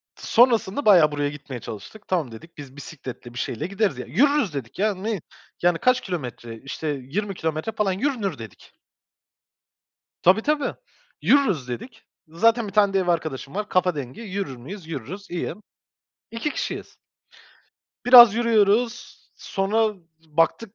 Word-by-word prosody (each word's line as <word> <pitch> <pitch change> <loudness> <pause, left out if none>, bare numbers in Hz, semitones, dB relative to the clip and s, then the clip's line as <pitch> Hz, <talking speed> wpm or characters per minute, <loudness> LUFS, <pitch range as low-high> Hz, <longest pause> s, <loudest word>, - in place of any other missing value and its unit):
sonrasında 235 0 +2
bayağı 175 -8 +6
buraya 145 0 -1
gitmeye 145 -3 -8
çalıştık. 160 - -10
Tamam 165 -9 -1
dedik, 135 +10 -13
biz 140 -2 -10
bisikletle 130 -4 -9
bir 120 - -6
şeyle 140 +6 -3
gideriz 200 +2 0
ya. - - -6
Yürürüz 280 - +2
dedik 135 -1 -7
ya; 210 +1 +2
ne, 200 0 -3 0.4
yani 175 -1 +3
kaç 255 +7 +2
kilometre? 125 - -6
İşte 140 +3 -5
yirmi 150 +9 -3
kilometre 160 +5 -2
falan, 210 -3 0
yürünür 205 - -1
dedik. 110 -4 -12 1.5
Tabii, 190 +5 +5
tabii, 295 +3 0 0.5
yürürüz 200 - +3
dedik. 220 - -7 0.2
Zaten 225 +8 +2
bir 195 - -8
tane 200 -1 +4
de 195 - +3
ev 185 - -2
arkadaşım 155 -5 -2
var, 210 +1 -3
kafa 180 -2 +2
dengi; 135 - -6
yürür 195 - -4
müyüz, 160 +9 -10
yürürüz, 165 - -7
iyi. 175 - -3 0.8
2 230 +6 -3
kişiyiz. - - -5 1.1
Biraz 240 -3 +10
yürüyoruz, 230 0 +1 0.2
sonra 210 +3 0 0.3
baktık, 165 +7 0
185 Hz, 140 wpm, -24 LUFS, 145-220 Hz, 1.5 s, Biraz